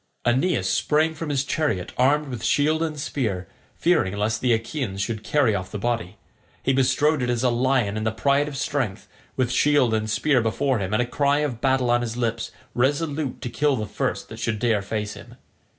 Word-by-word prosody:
Aeneas 130 +9 +2
sprang 155 +2 +2
from 160 -1 -5
his 140 -2 +1
chariot 140 - -1
armed 145 +3 +2
with 120 -4 -6
shield 155 +2 +2
and 155 -2 -2
spear, 110 -10 -2 0.3
fearing 160 - +2
lest 110 +2 0
the 125 - +2
Achaeans 115 -2 -2
should 110 +2 -2
carry 135 -7 +2
off 95 -2 -3
the 105 - -5
body. 115 -4 -2 0.5
He 135 - +2
bestrode 135 +3 +2
it 125 - -1
as 120 0 0
a 125 - +3
lion 120 -4 +1
in 110 - -2
the 110 - +1
pride 140 +6 +2
of 145 -2 -6
strength, 125 -6 -2 0.3
with 130 -2 0
shield 130 -2 +3
and 110 0 0
spear 130 +4 +2
before 125 +3 0
him 95 -1 -3
and 110 +3 +2
a - - -3
cry 140 +3 +1
of 130 -6 -3
battle 130 -2 +2
on 120 0 +3
his 120 -1 -4
lips 115 -1 -1 0.2
resolute 145 +2 -1
to 125 - -3
kill 140 +4 +2
the 110 -3 -3
first 105 - -3
that - - -9
should 110 - -1
dare 110 -2 +1
face 105 +1 -3
him. - - -12
125 Hz, 205 wpm, -24 LUFS, 110-145 Hz, 0.5 s, a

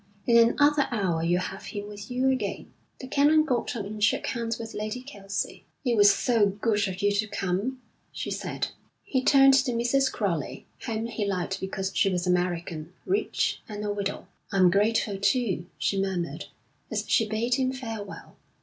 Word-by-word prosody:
In 235 - +4
another 290 +2 +3
hour 190 -8 0
you'll 175 +2 +2
have 195 +2 -6
him 205 -1 -6
with 205 +1 -9
you 255 +2 +2
again.' 260 - -3 0.3
The 260 - -7
Canon 295 +3 +4
got 250 -4 -1
up 210 -4 -3
and 210 +1 -5
shook 210 - +2
hands 230 -2 -2
with 225 -1 -7
Lady 215 +4 -4
Kelsey. 200 -8 -5 0.2
'It 240 -2 +2
was 205 -1 +7
so 225 -3 +3
good 205 +1 0
of 190 +1 -5
you 205 - +4
to 205 +2 0
come,' 205 +5 -2 0.3
she - - -5
said. - - -3 0.3
He 260 -2 -1
turned 270 -1 +7
to 265 -2 +3
Mrs. 265 +3 +2
Crowley, 170 - -2 0.2
whom 225 -1 -2
he 230 -2 -3
liked 190 -2 -2
because 190 0 -3
she 195 - +3
was 180 -1 -1
American, 175 -2 -1
rich, 395 +3 0
and 210 0 -5
a 205 - -1
widow. 200 0 -3 0.3
'I'm 185 -3 +5
grateful, 205 0 +1
too,' 200 -5 +1
she 195 -1 0
murmured, 185 -3 -3 0.5
as - - -1
she 225 -2 +2
bade 225 +3 0
him 260 0 +1
farewell. 225 -6 -7
210 Hz, 175 wpm, -27 LUFS, 195-245 Hz, 0.5 s, was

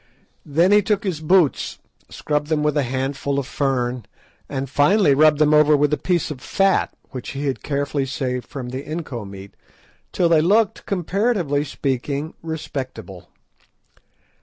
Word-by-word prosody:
Then 165 +6 +3
he 210 0 +6
took 205 0 0
his 185 -6 -2
boots, 165 -2 +2 0.3
scrubbed 150 -1 -2
them 155 -1 0
with 150 0 +1
a 145 - +3
handful 135 +2 -2
of 140 - -1
fern, 125 -5 -2 0.4
and 135 -1 -3
finally 145 - +4
rubbed 155 +1 +5
them 155 0 +3
over 150 0 +5
with 145 +1 +2
a - - +2
piece 175 -4 0
of 130 -4 -7
fat, 195 +6 +1 0.2
which 130 -1 -6
he 140 +1 -4
had 135 -2 -2
carefully 140 -1 -2
saved 125 -2 -3
from 130 -4 -6
the 130 +2 -5
inco 140 -10 -6
meat, 100 0 -11 0.6
till 175 - +2
they 165 -2 +4
looked, 205 +5 +2
comparatively 185 - 0
speaking, 140 +1 -3
respectable. 130 - -6
145 Hz, 155 wpm, -21 LUFS, 135-160 Hz, 0.6 s, he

